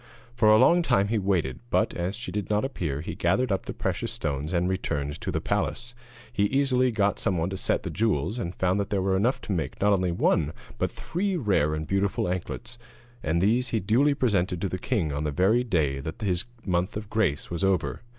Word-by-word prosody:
For 115 -3 +4
a 110 - +7
long 170 +9 +5
while 100 - +4
he 110 +1 0
waited, 90 -10 0
but, - - +1
as 90 +3 -2
she 120 +2 -6
did 105 -2 -3
not 105 +3 +1
appear, 75 - -3
he - - -5
gathered 105 +8 +1
up 95 - -1
the - - -2
precious - - -2
stones 70 +3 -3
and 90 0 +1
returned 75 -6 -2
to - - -3
the - - -1
palace. 120 +1 -2 0.4
He 100 - +2
easily 130 +1 +2
got 105 -3 +1
some 95 - 0
one 85 +3 -1
to 95 - -3
set - - 0
the - - -4
jewels, 105 - 0
and 85 -4 -4
found 95 +2 +1
that 100 - -2
there 100 -2 0
were 95 0 +2
enough 115 +7 +1
to - - -6
make, 85 -5 -2
not 105 +1 +4
only 90 -2 +1
one, 80 -2 +1 0.3
but - - +1
three 185 +2 -2
rare 95 - +1
and 80 0 -3
beautiful 95 +1 0
anklets, 115 +7 -5 0.4
and 80 +2 0
these 120 +5 +2
he 115 - 0
duly 130 +10 +3
presented 95 - +1
to 100 - -1
the 95 - -4
king 95 - -1
on 70 +1 -2
the 75 - 0
very 95 - +3
day 80 - 0
that 80 - -6
his 95 -2 0 0.2
month 90 +1 0
of 105 -1 -6
grace 90 - 0
was 85 +2 -2
over. 95 -1 +1
95 Hz, 225 wpm, -26 LUFS, 85-110 Hz, 0.4 s, a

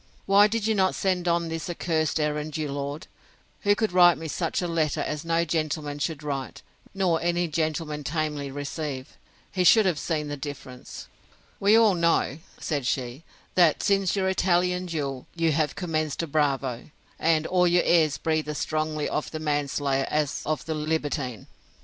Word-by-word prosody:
—Why 200 +1 +6
did 220 0 -2
you 220 - +2
not 190 -2 +2
send 180 -2 0
on 170 0 +1
this 165 +1 -4
accursed 160 -2 0
errand 150 0 -2
your 150 -2 -2
lord, 140 +2 -4 0.5
who 205 -1 +3
could 220 -1 0
write 175 -3 +6
me 160 +1 -6
such 165 +1 -2
a 180 - -1
letter 160 -3 0
as 150 -1 -3
no 165 0 +1
gentleman 155 -2 -2
should 155 0 -3
write, 140 -3 -4 0.3
nor 180 -4 +1
any 175 +1 +1
gentleman 155 -1 -2
tamely 150 -1 -2
receive? 140 -1 -5 0.4
He 185 -2 0
should 215 +5 +6
have 175 -6 +1
seen 150 -1 -2
the 145 - -3
difference. 135 -3 -8 0.5
We 205 +2 +5
all 225 -3 +6
know, 170 -4 +1 0.2
said 145 -6 -2
she, 125 +2 -2 0.3
that, 170 -4 +4
since 195 -2 +2
your 190 -1 +1
Italian 180 -1 +1
duel, 140 -6 -4
you 165 -1 +2
have 150 -1 0
commenced 155 -3 -2
a - - -3
bravo; 140 -5 -1 0.3
and 160 -1 +2
all 180 0 +3
your 175 0 +3
airs 160 -4 +3
breathe 155 -1 -1
as 150 - -3
strongly 155 0 -1
of 150 - -2
the 160 - -5
manslayer 145 -2 0
as 150 -2 0
of 155 -1 -1
the 160 - -2
libertine. 150 - -2
155 Hz, 175 wpm, -26 LUFS, 145-175 Hz, 0.5 s, Why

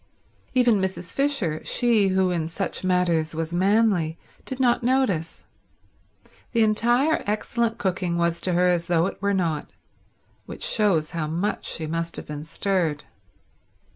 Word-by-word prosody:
Even 240 -5 +4
Mrs. 190 -2 -4
Fisher, 275 - 0
she 230 -5 +2
who 190 -1 +2
in 165 -3 -1
such 190 +4 -3
matters 175 -4 +1
was 165 +1 -3
manly, 190 -3 +2 0.3
did 260 - -5
not 245 -2 +3
notice. 240 -10 0 1.1
The 230 -2 +4
entire 240 +8 +2
excellent 225 +2 -1
cooking 180 -2 -1
was 170 0 0
to 185 - 0
her 180 +1 +3
as 175 -1 0
though 170 -1 +2
it 195 - -5
were 200 0 +1
not; 165 -5 -1 0.8
which - - -7
shows 185 -8 +2
how 160 -2 -2
much 175 +7 -2
she 160 - -3
must 165 +1 -3
have - - -5
been 150 0 -7
stirred. 165 -3 -1
185 Hz, 145 wpm, -24 LUFS, 165-215 Hz, 1.1 s, Even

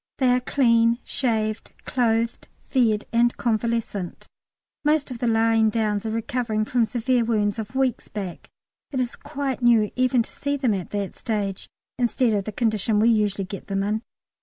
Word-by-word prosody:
They 260 -2 +3
are 250 0 +4
clean, 235 -3 +3
shaved, 220 -4 -1
clothed, 230 -2 0 0.2
fed, 225 -5 +2
and 240 +1 +3
convalescent. 230 -5 -2 0.6
Most 300 -2 +2
of 240 - -6
the 240 - 0
lying 225 -1 +3
downs 215 -1 -1
are - - -1
recovering 225 -1 -1
from 235 0 +1
severe 240 +2 +1
wounds 215 -2 0
of 220 +4 -6
weeks 265 -3 0
back. 195 -5 -6 0.4
It 265 - -3
is 245 -1 -1
quite 280 -3 -4
new 230 -3 +4
even 255 -1 +3
to - - -13
see 285 0 -2
them 255 -6 +1
at 185 -3 -4
that 200 -2 -3
stage, 205 -4 -3 0.3
instead 240 -1 +2
of 200 -2 0
the 215 - -4
condition 215 -1 +1
we 225 +2 +5
usually 205 -3 +1
get 195 +1 -8
them 195 -1 -1
in. 210 +2 -1
230 Hz, 170 wpm, -24 LUFS, 215-245 Hz, 0.6 s, we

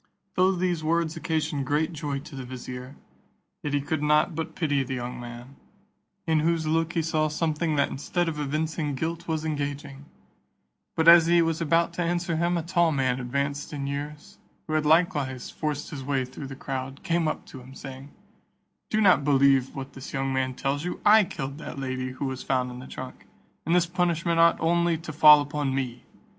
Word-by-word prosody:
Though 185 +1 +3
these 175 -3 -1
words 165 0 0
occasioned 155 -4 -2
great 155 +4 0
joy 145 -3 -3
to 145 0 -11
the 135 - -5
vizier, 125 +1 -8 0.7
yet 145 -1 -2
he 145 - +1
could 145 +2 -2
not 150 +3 +3
but 160 0 -5
pity 145 -5 +1
the 130 0 -3
young 125 0 -5
man, 120 +3 -10 0.7
in 160 -2 +2
whose 165 +1 +1
look 165 +1 0
he 165 - 0
saw 155 -1 +1
something 155 +1 -1
that 140 -1 +2
instead 175 +5 -1
of 155 -2 -3
evincing 150 0 -2
guilt 165 +4 -3
was 160 -1 -2
engaging: 145 -2 -4 0.9
but 160 0 +1
as 170 -1 +9
he 170 0 +5
was 165 0 -1
about 165 +1 +2
to 175 - -3
answer 175 0 0
him, 170 +2 +1
a 165 - -2
tall 170 -1 +2
man 130 -3 0
advanced 140 +4 -2
in 140 -2 -3
years, 145 +2 -6 0.3
who 155 - -4
had 155 -1 +1
likewise 150 -6 +1
forced 150 -1 -3
his 140 -4 -6
way 135 -1 0
through 130 +2 -8
the 135 - -8
crowd, 135 0 -5
came 170 -3 +1
up - - -3
to 130 - -11
him, 130 +2 -13
saying, 135 +1 -9 0.8
"Do 215 - +1
not 185 -8 +5
believe 135 -2 +3
what 135 0 -7
this 135 +3 -9
young 135 -1 -1
man 130 -1 -1
tells 140 +3 -2
you, 180 - -4
I 215 0 +7
killed 140 -4 -6
that 150 - -7
lady 130 -1 -3
who 130 - -4
was 130 -1 -4
found 125 -2 0
in 125 - -8
the 130 - -10
trunk, 130 0 -9 0.4
and 170 - +3
this 180 -1 +4
punishment 170 -1 0
ought 170 0 +5
only 170 0 +2
to 160 -1 -8
fall 150 0 +8
upon 145 -2 -2
me. 125 -2 -4
150 Hz, 200 wpm, -26 LUFS, 135-165 Hz, 0.9 s, as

